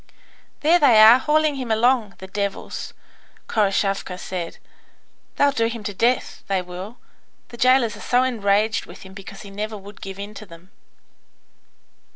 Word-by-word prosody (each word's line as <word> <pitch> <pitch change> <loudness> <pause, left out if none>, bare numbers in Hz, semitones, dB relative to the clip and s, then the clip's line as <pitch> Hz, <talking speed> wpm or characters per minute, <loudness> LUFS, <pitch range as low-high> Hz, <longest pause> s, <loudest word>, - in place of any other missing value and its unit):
"There 330 +4 +4
they 250 -8 +6
are, 220 +3 +9
hauling 305 0 +1
him 255 -3 -5
along, 225 -1 +2
the 190 - -10
devils!" 200 +1 -5 0.5
Khoroshavka 195 -3 0
said. 180 -2 -6 0.8
"They'll 285 0 +3
do 230 -4 0
him 230 -1 -6
to 205 0 -4
death, 235 +6 0
they 195 -1 +1
will. 180 +5 -8 0.5
The 235 - -11
jailers 255 -3 +3
are - - -12
so 250 +1 +2
enraged 215 -3 +1
with - - -12
him 190 0 -13
because 195 0 -10
he 200 - -11
never 215 +2 -5
would 200 +1 -13
give 195 0 -7
in 200 +1 -7
to 215 - -10
them." 170 +2 -15
215 Hz, 160 wpm, -22 LUFS, 195-245 Hz, 0.8 s, are